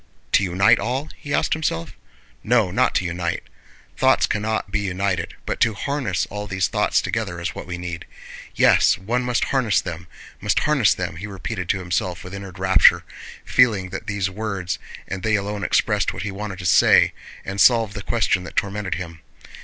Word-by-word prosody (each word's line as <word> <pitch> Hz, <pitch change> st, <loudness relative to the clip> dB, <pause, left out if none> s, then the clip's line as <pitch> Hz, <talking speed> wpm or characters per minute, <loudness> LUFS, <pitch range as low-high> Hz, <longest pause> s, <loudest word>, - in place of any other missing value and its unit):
To -, -, +4 dB
unite 100 Hz, +5 st, +4 dB
all?" 130 Hz, +8 st, -2 dB
he 145 Hz, -, -9 dB
asked -, -, +1 dB
himself. 85 Hz, -, -2 dB, 0.5 s
"No, 110 Hz, -5 st, +2 dB
not 125 Hz, +7 st, +1 dB
to 90 Hz, -, +1 dB
unite. 85 Hz, -1 st, -2 dB, 0.5 s
Thoughts -, -, +4 dB
cannot 110 Hz, -1 st, -2 dB
be 105 Hz, -, 0 dB
united, 95 Hz, -1 st, -2 dB
but -, -, -3 dB
to 110 Hz, -3 st, +2 dB
harness 125 Hz, -, -1 dB
all 105 Hz, 0 st, -5 dB
these 95 Hz, -2 st, 0 dB
thoughts -, -, +1 dB
together -, -, -3 dB
is -, -, -3 dB
what -, -, -8 dB
we 90 Hz, -1 st, -4 dB
need! 85 Hz, -1 st, -6 dB, 0.5 s
Yes, -, -, +5 dB
one 115 Hz, +6 st, -1 dB
must 125 Hz, -1 st, 0 dB
harness 125 Hz, -6 st, +2 dB
them, 85 Hz, -1 st, -6 dB, 0.3 s
must -, -, +1 dB
harness 140 Hz, -, +3 dB
them!" 90 Hz, -3 st, -4 dB
he 100 Hz, +5 st, -6 dB
repeated 95 Hz, -1 st, -5 dB
to -, -, +2 dB
himself 90 Hz, -1 st, -2 dB
with 90 Hz, -, -9 dB
inward 95 Hz, -2 st, -8 dB
rapture, 95 Hz, 0 st, +5 dB, 0.4 s
feeling 105 Hz, -7 st, +3 dB
that 95 Hz, -, -7 dB
these 100 Hz, -2 st, -1 dB
words 95 Hz, -4 st, -4 dB, 0.3 s
and 95 Hz, -1 st, -5 dB
they 110 Hz, +2 st, +1 dB
alone 100 Hz, 0 st, -3 dB
expressed -, -, +1 dB
what 95 Hz, -, -5 dB
he 105 Hz, -, -3 dB
wanted 100 Hz, -1 st, -6 dB
to 90 Hz, -, -8 dB
say 85 Hz, -, +5 dB, 0.3 s
and 100 Hz, 0 st, -2 dB
solved 115 Hz, -3 st, +5 dB
the 105 Hz, -, -6 dB
question 100 Hz, -4 st, 0 dB
that 85 Hz, -, -10 dB
tormented 100 Hz, -2 st, -1 dB
him. 85 Hz, -2 st, -7 dB
100 Hz, 185 wpm, -22 LUFS, 90-110 Hz, 0.5 s, Yes